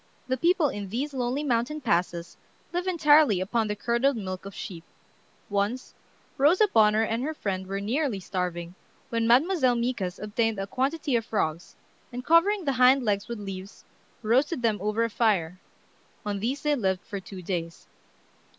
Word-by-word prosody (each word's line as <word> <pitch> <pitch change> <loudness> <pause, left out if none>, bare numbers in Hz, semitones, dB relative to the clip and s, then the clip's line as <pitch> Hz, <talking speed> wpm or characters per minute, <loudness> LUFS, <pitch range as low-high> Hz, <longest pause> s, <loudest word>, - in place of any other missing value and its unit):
The 260 - +1
people 335 +2 +2
in 205 -4 -6
these 270 +8 -3
lonely 255 +2 -1
mountain 250 +3 0
passes 175 - -1 0.4
live 355 +1 -2
entirely 300 - +5
upon 220 +4 0
the 210 - -2
curdled 235 +5 +1
milk 185 -2 -5
of 195 - -10
sheep. 170 -4 -7 0.6
Once 205 +5 -2 0.5
Rosa 350 +10 +5
Bonheur 215 0 +5
and 225 +1 -1
her 310 +4 -3
friend 190 -7 -3
were 195 +1 -3
nearly 235 +2 -1
starving, 180 -2 -4 0.4
when 230 -1 0
Mademoiselle 260 +1 +4
Micas 235 -7 -2
obtained 220 +1 -1
a 195 - -2
quantity 270 +6 -1
of 230 - +1
frogs, 170 -7 -2 0.4
and 250 +1 -6
covering 355 +4 +4
the 280 - +2
hind 255 +1 +6
legs 200 -2 0
with 235 -1 -5
leaves, 195 0 -8 0.4
roasted 255 +5 +1
them 220 -3 +1
over 210 +3 0
a 230 - 0
fire. 185 -7 +1 0.7
On 205 -1 -2
these 255 +7 -2
they 300 -1 +2
lived 190 -7 -1
for 200 -3 -5
two 190 -1 -10
days. 170 -2 -4
230 Hz, 165 wpm, -27 LUFS, 195-270 Hz, 0.7 s, hind